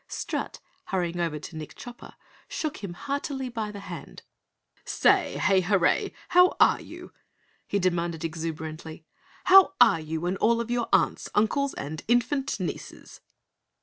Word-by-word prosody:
Strut, - - -4 0.3
hurrying 175 -3 -2
over 165 -3 -1
to 155 +2 -9
Nick 155 -1 -8
Chopper, 240 0 -11 0.3
shook 310 -3 -3
him 185 -4 -7
heartily 275 +1 -3
by 225 -3 -4
the 205 -1 -8
hand. - - -9 0.6
"Say, - - +2
Hay 190 -1 +3
Hurray! 185 -1 +2 0.2
How 360 0 +5
ARE - - +5
you?" - - -11 0.5
he 200 - 0
demanded 170 -3 -1
exuberantly. 160 0 -6 0.4
"How 380 0 +7
are 165 - +6
you 160 +1 -4
and 185 +2 -1
all 230 +3 +3
of 235 0 -3
your 240 -1 -1
aunts, - - +2
uncles 270 +7 +1
and 155 +2 -5
infant 245 +4 +1
nieces?" - - -7
195 Hz, 145 wpm, -26 LUFS, 165-245 Hz, 0.6 s, How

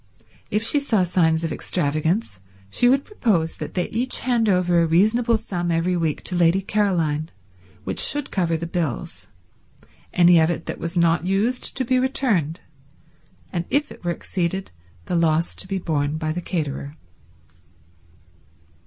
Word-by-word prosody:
If 210 +2 0
she 290 +6 +3
saw 225 -9 +1
signs 165 -2 +2
of 165 - -2
extravagance 155 - -1 0.3
she 245 - +3
would 275 +2 +2
propose 195 - 0
that - - -7
they 180 - 0
each 250 +3 -1
hand 235 -4 +1
over 180 -2 +3
a 165 - +2
reasonable 220 +8 +3
sum 175 -5 -4
every 170 +2 +1
week 165 -3 -1
to 180 - -2
Lady 175 +2 +3
Caroline 170 -7 0 0.5
which - - -4
should 290 -1 +2
cover 170 -4 0
the 165 - -5
bills, 165 -6 -4 0.8
any 175 -1 +6
of 160 0 +3
it 175 - -3
that - - -5
was 170 +2 -4
not 170 0 +2
used 215 +7 0
to 260 - 0
be 255 +1 +2
returned, 215 - 0 0.9
and 170 -1 -2
if 290 +1 0
it - - -13
were 175 - -1
exceeded 180 +2 -3 0.3
the 180 - -2
loss 165 0 +2
to - - -7
be 195 0 -2
borne 150 -4 -1
by 155 -1 -2
the 175 +3 -3
caterer. 150 -4 -4
175 Hz, 160 wpm, -22 LUFS, 165-210 Hz, 0.9 s, any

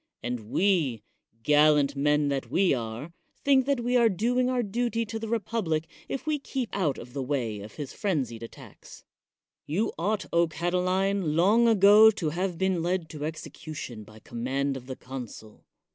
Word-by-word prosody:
And 120 -3 -4
we, 160 - +1 0.4
gallant 150 -1 +4
men 150 +1 +2
that 140 -1 -2
we 190 -4 +3
are, 120 +5 -4 0.3
think 270 -2 +4
that 280 -3 +1
we 245 +1 0
are 235 -2 +5
doing 245 +6 +1
our 250 -1 +1
duty 230 +2 -1
to 225 +1 -5
the 225 - -5
republic 205 -8 -1 0.2
if 270 - -4
we 305 -1 0
keep 265 -4 -4
out 165 -9 0
of 120 +1 -10
the 140 - -3
way 125 -6 -2
of 105 +2 -10
his 145 -4 -6
frenzied 135 - -2
attacks. 115 - -12 0.6
You 190 +10 -1
ought, 195 0 0
O 170 0 +4
Catiline, 180 +1 0
long 210 +8 +4
ago 210 0 +7
to 195 -8 -1
have 180 +1 -2
been 190 -1 +1
led 175 -1 -1
to 150 -1 -5
execution 155 -6 -7
by 110 +1 -15
command 135 +5 -2
of 130 -1 -9
the 130 - -5
consul. 125 -5 -9
170 Hz, 170 wpm, -27 LUFS, 135-215 Hz, 0.6 s, ago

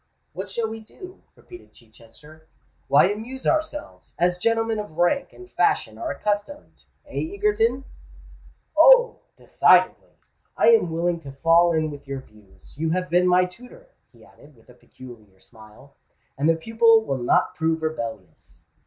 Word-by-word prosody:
"What 190 +3 -7
shall 225 +3 -3
we 225 0 -7
do?" 365 - -14
repeated 360 0 -16
Chichester. 120 +8 -19 0.4
"Why, 140 - +5
amuse 240 +6 -8
ourselves—as 295 - -2
gentlemen 225 +1 0
of 210 -7 -8
rank 175 +11 0
and 370 0 -15
fashion - - 0
are 330 - -4
accustomed—eh, 290 - -6
Egerton?" 270 - 0 0.9
"Oh! - - +5 0.2
decidedly. - - +2 0.4
I - - +4
am 225 -7 +4
willing 170 +1 -2
to 140 -4 -11
fall 165 +5 +3
in 155 -1 -1
with 145 -1 -12
your 135 -1 -5
views. 105 -5 -20
You 160 0 -1
have 180 +2 -2
been 180 +1 +3
my 180 0 +4
tutor," 250 - -15 0.2
he - - -20
added, 145 0 -20
with 115 0 -25
a - - -15
peculiar 120 -6 -16
smile; 110 +6 -18 0.4
"and 145 +4 0
the 165 - +3
pupil 225 +5 +3
will 135 -1 -3
not 120 - +1
prove 160 0 -2
rebellious." 110 - -7
175 Hz, 145 wpm, -23 LUFS, 140-230 Hz, 0.9 s, Why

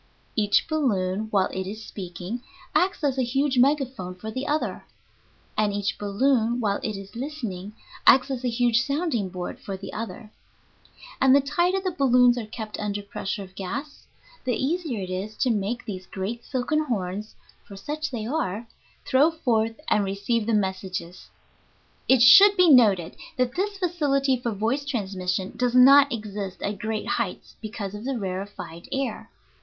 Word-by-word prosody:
Each 210 -2 +2
balloon, 215 - 0
while 195 -3 +3
it 190 0 -3
is 215 +2 -7
speaking, 185 +4 -6 0.3
acts 370 -2 +1
as 270 -2 +1
a - - +3
huge 265 +2 +1
megaphone 260 -9 +1
for 215 +4 -7
the 260 +5 -4
other, 300 +1 -2 0.7
and 210 -1 +2
each 205 +1 -2
balloon, 230 +3 +1
while 205 -4 0
it 215 -2 -3
is 195 +3 -11
listening, 230 -8 -5 0.3
acts 265 +1 +6
as 260 -1 -3
a 250 - +1
huge 235 0 +2
sounding 280 - -1
board 180 0 -6
for 195 -1 -6
the 195 +1 -8
other; 225 0 -6 0.9
and 265 0 +6
the - - +7
tighter 345 +7 +1
the 375 -1 -2
balloons 250 -6 +4
are 220 - -6
kept 215 -1 -7
under 205 -1 -3
pressure 200 0 -4
of 185 -1 -13
gas, 270 +11 -6 0.4
the 250 -2 0
easier 280 - -1
it 185 - -6
is 195 +4 -4
to 255 - +2
make 220 +3 -2
these 185 -3 -6
great 215 +5 -5
silken 300 +4 -1
horns 205 -4 -3 0.3
(for 200 - -12
such 305 +9 -4
they 230 -5 -4
are) 230 - -2 0.4
throw 280 +4 +4
forth 230 -8 0
and 210 - +3
receive 200 +3 -1
the 230 - +1
messages. 190 -3 -3 0.8
It 260 -2 +6
should 395 +10 +9
be 360 -3 +6
noted 205 - +5 0.2
that 250 -1 +1
this 400 +4 -2
facility 290 -7 +1
for 240 -1 -3
voice 225 +7 -1
transmission 190 -7 -2
does 250 -1 0
not 275 +3 +8
exist 205 -4 -5
at 200 -1 -3
great 220 -1 -3
heights 230 -6 -3
because 210 -3 -5
of 210 +3 -7
the 270 -1 -1
rarefied 190 -4 -6
air. 265 -5 -3
230 Hz, 165 wpm, -25 LUFS, 200-270 Hz, 0.9 s, should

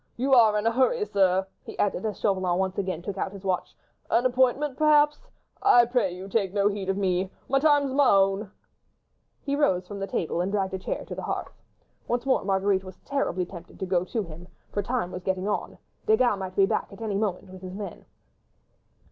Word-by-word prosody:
You 265 +3 +1
are 220 -4 +6
in 210 - -1
a 230 - +4
hurry, 340 - +2
sir," 190 - +2 0.2
he - - -10
added, 205 0 0
as 210 - -5
Chauvelin 185 -3 +1
once 190 0 -1
again 185 -4 -3
took 195 0 -5
out 190 - -2
his 200 -1 -10
watch; 185 -2 -2 0.3
"an 245 - +2
appointment, 260 +2 +2
perhaps.... 300 0 +3 0.3
I 245 -13 +6
pray 240 -6 +1
you 185 +2 -8
take 195 -1 -1
no 200 0 +3
heed 200 -2 -4
of 195 - 0
me.... 185 -1 0 0.2
My 275 - +2
time's 290 -2 +3
my 275 -2 +4
own." 195 +1 +3 0.9
He 280 0 -1
rose 185 -11 +1
from 205 0 -7
the 195 - -3
table 170 -2 -1
and 185 +2 -1
dragged 195 -2 -1
a 190 - -2
chair - - -4
to - - -7
the - - -5
hearth. - - -4 0.5
Once 240 +2 -1
more 265 - +2
Marguerite 190 0 +1
was 185 -1 -11
terribly 190 -10 -1
tempted 175 0 -12
to 190 - -2
go 180 -1 +1
to 220 +3 -2
him, 170 0 -11 0.2
for 205 - -1
time 225 -3 -2
was 180 - -6
getting 190 +1 -2
on; 210 - -2 0.3
Desgas 255 - +4
might 190 -1 -6
be 195 - +5
back - - -1
at 200 - -12
any 215 -2 -2
moment 195 -2 -2
with 185 -1 -11
his 185 0 -7
men. 200 -4 -7
200 Hz, 215 wpm, -26 LUFS, 185-245 Hz, 0.9 s, are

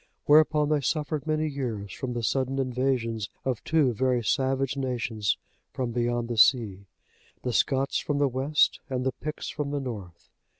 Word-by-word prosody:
Whereupon 150 0 +5
they 150 -2 +2
suffered 150 +2 -2
many 155 0 +1
years 120 -9 -4
from 125 -2 -4
the 120 -1 -3
sudden 135 +2 0
invasions 125 -5 -1 0.2
of 130 -4 -1
two 150 -6 +2
very 125 0 +1
savage 135 +2 +1
nations 115 -6 -1 0.4
from 125 -2 -2
beyond 120 0 0
the 120 -1 -3
sea, 105 -5 +4 0.6
the 125 - -1
Scots 135 +3 +1
from 145 - -2
the 145 0 +3
west, 135 +4 +2
and 130 -1 -2
the 130 - +2
Picts 150 +3 -6
from 150 -1 -3
the 145 0 -1
north. 100 -10 -8
130 Hz, 165 wpm, -27 LUFS, 120-140 Hz, 0.6 s, Whereupon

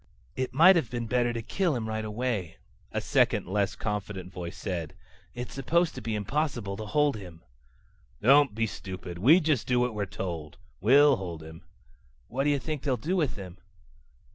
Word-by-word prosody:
"It 130 -1 -2
might 170 +8 +7
have 135 -9 0
been 120 -1 -3
better 120 +1 +1
to 115 -1 -4
kill 170 - 0
him 115 -2 -3
right 110 0 -2
away," 110 -6 -3 0.3
a - - -1
second, - - +2
less 100 +2 0
confident 100 -3 -4
voice 85 -1 -6
said. 85 -6 -4 0.4
"It's 120 0 -6
supposed 165 +6 +1
to 130 - -7
be 110 0 -2
impossible 115 -2 -2
to 110 0 -6
hold 145 +2 +2
him." 90 -5 -11 0.8
"Don't 135 +1 +5
be 115 0 +1
stupid. 95 -4 -7
We 145 - +7
just 155 -8 0
do 125 -1 +2
what 125 -1 +1
we're 105 -2 -2
told. 85 -5 -5 0.2
We'll 140 +6 +6
hold 85 -4 -6
him." 80 +1 -11 0.7
"What 135 +4 -1
do - - +3
you 145 - +3
think 150 0 -4
they'll 135 -4 0
do 165 - -2
with 155 -8 0
him?" 95 -3 -9
115 Hz, 185 wpm, -28 LUFS, 95-135 Hz, 0.8 s, might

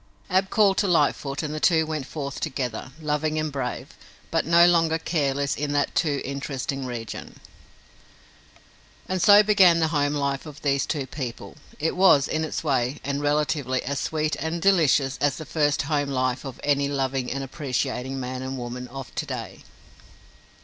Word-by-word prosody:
Ab 190 +1 +2
called 200 -3 +3
to 200 - +2
Lightfoot 145 -4 +1
and 150 0 -3
the 155 - -3
two 160 -1 +3
went 155 -4 -4
forth 140 -3 -5
together, 130 -1 -4
loving 155 0 -1
and 155 -1 -1
brave, 135 -3 -4 0.4
but - - 0
no 170 +1 +7
longer 165 -2 +3
careless 140 -4 -1
in 145 0 -2
that 145 0 +1
too 145 -5 0
interesting 135 -1 -4
region. 115 -3 -7 1.7
And 185 -1 -1
so 205 +2 +8
began 190 -5 +5
the 160 -1 +2
home 145 -2 +1
life 140 +1 -2
of 150 0 -11
these 140 -1 +1
two 145 -4 -2
people. 130 -4 -7 0.2
It 160 +2 -1
was, 180 -7 +5
in 160 0 -1
its 160 +2 -3
way 135 -2 0
and 140 +1 -2
relatively, 145 -3 0
as 140 +2 -2
sweet 155 -1 -1
and 160 +2 -3
delicious 155 -7 +3
as 145 -2 +2
the 155 - -7
first 150 0 +1
home 145 -1 -1
life 130 0 -1
of 135 -3 -7
any 140 -1 +2
loving 135 -2 -2
and 135 +1 -3
appreciating 135 -2 -3
man 130 0 -4
and 130 +1 -4
woman 125 +1 -6
of 130 -3 -9
to - - -3
day. - - -6
145 Hz, 170 wpm, -25 LUFS, 135-160 Hz, 1.7 s, so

